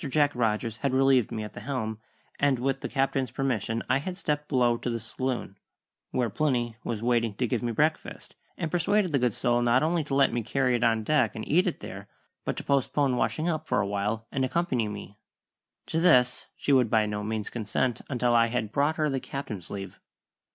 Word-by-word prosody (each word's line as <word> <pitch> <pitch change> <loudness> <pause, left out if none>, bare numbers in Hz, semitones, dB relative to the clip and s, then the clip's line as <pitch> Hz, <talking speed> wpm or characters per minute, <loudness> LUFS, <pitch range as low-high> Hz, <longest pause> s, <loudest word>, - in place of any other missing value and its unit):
Jack 145 0 +3
Rogers 115 -1 0
had 135 +1 -1
relieved 135 -3 +4
me 110 -1 -3
at 105 - -8
the - - -7
helm, 110 -2 -3 0.4
and 140 -2 +3
with 135 +2 -1
the - - -4
Captain's 135 -2 0
permission 115 -3 -1
I 130 +2 +3
had 180 +5 -5
stepped 150 -5 -2
below 120 -4 +3
to 120 - -4
the 115 -1 -2
saloon, 115 -3 -4 0.5
where 120 -4 0
Plinny 120 -4 0
was 115 -1 -3
waiting 115 -3 +1
to 125 - 0
give 120 0 -1
me 120 -1 -1
breakfast, 155 +7 -1 0.2
and 160 -2 -3
persuaded 185 +1 +2
the 140 - +3
good 125 -4 +1
soul 120 -1 +1
not 120 +3 +3
only 165 +1 +1
to 140 - -2
let 140 0 +4
me 120 - 0
carry 130 +3 +1
it 120 -1 +1
on 115 -1 +2
deck 130 -3 +2
and 110 - -5
eat 180 +5 +3
it 175 - -3
there, - - -8 0.4
but - - -2
to - - -4
postpone 140 -1 +1
washing 120 +7 0
up 155 -2 -2
for - - +1
a - - +1
while 105 +3 -2
and 135 - 0
accompany 130 -5 0
me. 105 0 -8 0.7
To 160 - -1
this 125 -8 +4
she 145 - 0
would 125 -4 +4
by 110 -1 +3
no 105 0 -3
means 110 0 -3
consent 115 +2 -1
until 125 -3 +1
I 115 0 +5
had 115 -3 -2
brought 145 +5 +1
her 155 -1 +1
the 135 -2 -1
Captain's 110 -10 -6
leave. 95 -2 -7
125 Hz, 215 wpm, -27 LUFS, 110-140 Hz, 0.7 s, I